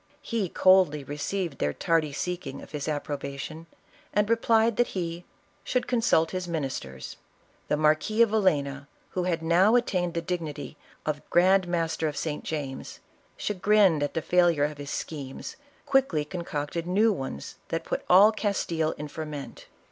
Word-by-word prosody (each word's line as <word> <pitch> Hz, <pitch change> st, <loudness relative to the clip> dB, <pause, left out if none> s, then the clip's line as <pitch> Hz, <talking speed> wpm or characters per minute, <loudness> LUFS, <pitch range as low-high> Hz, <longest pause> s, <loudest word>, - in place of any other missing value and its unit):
He 220 Hz, -6 st, -1 dB
coldly 185 Hz, -7 st, +4 dB
received 150 Hz, +3 st, -3 dB
their 75 Hz, 0 st, 0 dB
tardy 160 Hz, -, +1 dB
seeking 175 Hz, -2 st, -4 dB
of -, -, -13 dB
his 145 Hz, -1 st, -4 dB
approbation, 145 Hz, +1 st, -4 dB, 0.5 s
and 210 Hz, +1 st, +2 dB
replied 230 Hz, -1 st, +3 dB
that 240 Hz, -, +3 dB
he 170 Hz, -1 st, -3 dB, 0.4 s
"should 250 Hz, -, 0 dB
consult 225 Hz, -10 st, +2 dB
his 185 Hz, -1 st, -3 dB
ministers." 135 Hz, -, -4 dB, 0.5 s
The 150 Hz, -, +1 dB
Marquis 155 Hz, +9 st, +3 dB
of 225 Hz, -, +1 dB
Vil 220 Hz, -1 st, +2 dB
lena, 140 Hz, -6 st, 0 dB, 0.2 s
who 180 Hz, -1 st, -1 dB
had 170 Hz, -2 st, -1 dB
now 180 Hz, +7 st, +4 dB
attained 180 Hz, -8 st, +1 dB
the 170 Hz, -, 0 dB
dignity 155 Hz, -5 st, -4 dB, 0.3 s
of 150 Hz, -1 st, -2 dB
grand 185 Hz, +1 st, +4 dB
mas 165 Hz, -2 st, 0 dB
ter 160 Hz, -, 0 dB
of 150 Hz, -, -4 dB
St. 150 Hz, -2 st, -3 dB
James, 140 Hz, -4 st, -5 dB, 0.4 s
chagrined 200 Hz, -5 st, +3 dB
at 145 Hz, -, -2 dB
the 165 Hz, -, -1 dB
failure 175 Hz, -4 st, +3 dB
of 150 Hz, 0 st, -2 dB
his 140 Hz, 0 st, -6 dB
schemes, 140 Hz, -4 st, -5 dB, 0.3 s
quickly 260 Hz, -, +2 dB
concocted 170 Hz, -1 st, -4 dB
new 210 Hz, +4 st, +3 dB
ones 135 Hz, -, -6 dB
that -, -, -2 dB
put -, -, -3 dB
all 195 Hz, +4 st, +8 dB
Castile 175 Hz, -7 st, -1 dB
in 150 Hz, -, -5 dB
fer 155 Hz, +1 st, -6 dB
ment. 145 Hz, -2 st, -8 dB
165 Hz, 160 wpm, -27 LUFS, 150-190 Hz, 0.5 s, all